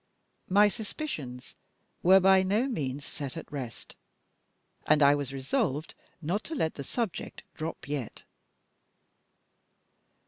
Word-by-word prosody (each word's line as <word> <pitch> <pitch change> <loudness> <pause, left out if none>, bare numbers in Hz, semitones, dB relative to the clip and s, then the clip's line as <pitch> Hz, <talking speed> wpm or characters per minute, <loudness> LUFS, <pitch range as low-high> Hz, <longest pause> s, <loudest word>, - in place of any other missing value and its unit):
My 205 +3 +6
suspicions 200 - -5 0.5
were 190 +2 +7
by 190 0 +6
no 205 +6 +2
means 140 - -3
set 140 0 -6
at 165 - -8
rest; 130 -6 -7 0.9
and 150 -1 +5
I 140 0 +7
was 145 -2 -2
resolved 135 +2 -1 0.3
not 185 +8 -1
to 325 - -4
let 160 - 0
the 140 - -6
subject 225 - -3
drop 160 -2 -5
yet. 140 -5 -4
155 Hz, 115 wpm, -29 LUFS, 140-195 Hz, 0.9 s, were